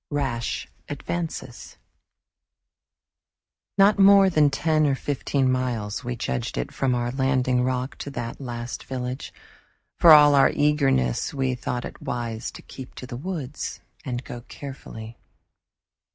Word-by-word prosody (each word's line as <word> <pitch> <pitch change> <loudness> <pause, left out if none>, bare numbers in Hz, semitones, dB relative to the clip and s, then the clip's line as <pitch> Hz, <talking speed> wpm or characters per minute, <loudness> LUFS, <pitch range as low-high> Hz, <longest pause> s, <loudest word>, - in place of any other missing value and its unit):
Rash 135 -5 -2 0.2
Advances 145 -3 -5 2.0
Not 200 +1 +5
more 195 -1 +7
than 150 -3 +4
ten 155 +2 +2
or 140 - +2
fifteen 135 -1 0
miles 120 -5 -2
we 125 0 -3
judged 65 - -3
it 60 - -2
from 130 -2 +1
our 120 0 -1
landing 130 -1 +1
rock 130 +1 -2
to - - -5
that 120 -1 -5
last 120 -2 -5
village. 130 0 -4 0.7
For 170 - +8
all 150 -1 +9
our 140 -1 +6
eagerness 140 - +2
we 130 -2 0
thought 125 0 -3
it - - -9
wise 115 -1 -3
to - - -11
keep 130 -1 -10
to - - -7
the 125 -1 -7
woods 150 -1 -5 0.2
and 125 -3 -4
go 120 -2 -8
carefully. 115 -5 -9
130 Hz, 135 wpm, -25 LUFS, 120-145 Hz, 2.0 s, all